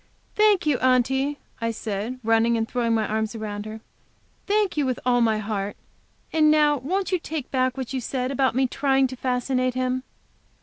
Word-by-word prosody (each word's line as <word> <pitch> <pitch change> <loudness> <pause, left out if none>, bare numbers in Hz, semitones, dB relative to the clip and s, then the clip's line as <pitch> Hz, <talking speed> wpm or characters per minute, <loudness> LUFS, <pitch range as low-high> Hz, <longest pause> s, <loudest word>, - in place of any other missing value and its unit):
"Thank 425 -4 +4
you, 295 -4 +2
Aunty," 265 +3 +2 0.2
I 230 - 0
said, 225 +2 -4
running 225 +1 +3
and 225 0 -1
throwing 235 -2 0
my 220 -1 +1
arms 220 +1 -2
around 210 -1 -5
her; 220 0 -8 0.7
"thank 415 -2 +1
you 295 - +1
with 255 -2 -1
all 245 -1 +3
my 220 -2 +3
heart. 205 -1 -3 0.6
And 310 -1 +5
now 300 -1 +4
won't 370 +10 -2
you 365 - +2
take 315 -4 -5
back 255 0 +1
what 260 -1 -4
you 260 - -1
said 255 +1 -2
about 265 -2 +1
my 265 +1 +3
trying 270 +1 +2
to 260 0 -4
fascinate 255 0 -1
him?" 255 0 0
255 Hz, 185 wpm, -24 LUFS, 230-275 Hz, 0.7 s, And